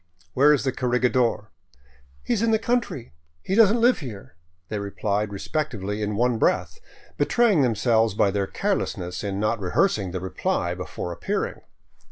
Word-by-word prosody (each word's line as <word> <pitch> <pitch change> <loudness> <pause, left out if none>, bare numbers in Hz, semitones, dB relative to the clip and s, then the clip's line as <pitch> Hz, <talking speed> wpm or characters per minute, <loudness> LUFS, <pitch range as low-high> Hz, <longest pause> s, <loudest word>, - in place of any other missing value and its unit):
"Where 145 +3 +5
is 150 - +2
the 135 - 0
corregidor?" 125 -4 0 0.3
" 65 0 -31
He - - 0
is 220 - 0
in 230 - +2
the 220 - +4
country. 230 - -2 0.3
He - - -3
does 210 -1 +6
n't 235 - +1
live 245 +2 +4
here," 115 - -9 0.3
they 105 - -3
replied 100 +1 -2
re 100 - -5
spectively 105 -7 -3
in 105 0 -2
one 120 +1 +1
breath, 185 - 0 0.4
betraying 230 -10 +3
themselves 115 -3 +2
by 100 - +3
their 100 -1 -1
carelessness 90 0 -2
in 100 -1 -3
not 110 +2 0
rehearsing 100 - +1
the 90 +1 -4
reply 90 -1 -2
before 90 -1 -6
appearing. 85 - -3
110 Hz, 170 wpm, -24 LUFS, 100-145 Hz, 0.4 s, does